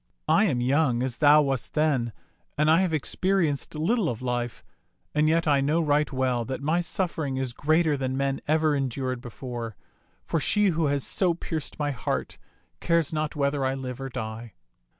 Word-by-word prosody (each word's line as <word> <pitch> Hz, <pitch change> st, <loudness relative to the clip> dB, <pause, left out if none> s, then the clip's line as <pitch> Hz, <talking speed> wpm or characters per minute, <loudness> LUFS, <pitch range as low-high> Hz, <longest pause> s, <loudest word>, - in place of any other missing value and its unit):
I 220 Hz, -, +4 dB
am 130 Hz, -, 0 dB
young, 130 Hz, -1 st, +2 dB
as 130 Hz, -2 st, -3 dB
thou 150 Hz, 0 st, +6 dB
wast 135 Hz, -3 st, -2 dB
then, 145 Hz, -7 st, +1 dB, 0.5 s
and 150 Hz, +1 st, +4 dB
I 165 Hz, +3 st, +5 dB
have 185 Hz, -3 st, +1 dB
experienced 160 Hz, 0 st, 0 dB
little 180 Hz, +4 st, +1 dB
of 115 Hz, +1 st, -5 dB
life, 120 Hz, -1 st, -3 dB, 0.5 s
and 150 Hz, +1 st, +3 dB
yet 165 Hz, 0 st, +2 dB
I 140 Hz, -2 st, +4 dB
know 150 Hz, +4 st, +2 dB
right 150 Hz, -2 st, +1 dB
well 130 Hz, -3 st, 0 dB
that 130 Hz, +2 st, -4 dB
my 155 Hz, +5 st, +1 dB
suffering 165 Hz, -7 st, -2 dB
is 130 Hz, -2 st, -2 dB
greater 155 Hz, +3 st, +2 dB
than 130 Hz, -1 st, -2 dB
men 135 Hz, 0 st, -1 dB
ever 155 Hz, 0 st, +2 dB
endured 130 Hz, -2 st, -2 dB
before, 120 Hz, -2 st, -6 dB, 0.5 s
for 165 Hz, -, 0 dB
she 210 Hz, +7 st, +3 dB
who 165 Hz, -3 st, +1 dB
has 140 Hz, -1 st, 0 dB
so 180 Hz, -3 st, +2 dB
pierced 160 Hz, -3 st, -5 dB
my 145 Hz, -1 st, -1 dB
heart 125 Hz, -, -3 dB, 0.4 s
cares 170 Hz, -3 st, +1 dB
not 155 Hz, 0 st, -2 dB
whether 140 Hz, -1 st, 0 dB
I 130 Hz, 0 st, 0 dB
live 130 Hz, -1 st, -6 dB
or 135 Hz, -, -4 dB
die. 115 Hz, -2 st, -6 dB
145 Hz, 180 wpm, -26 LUFS, 130-160 Hz, 0.5 s, thou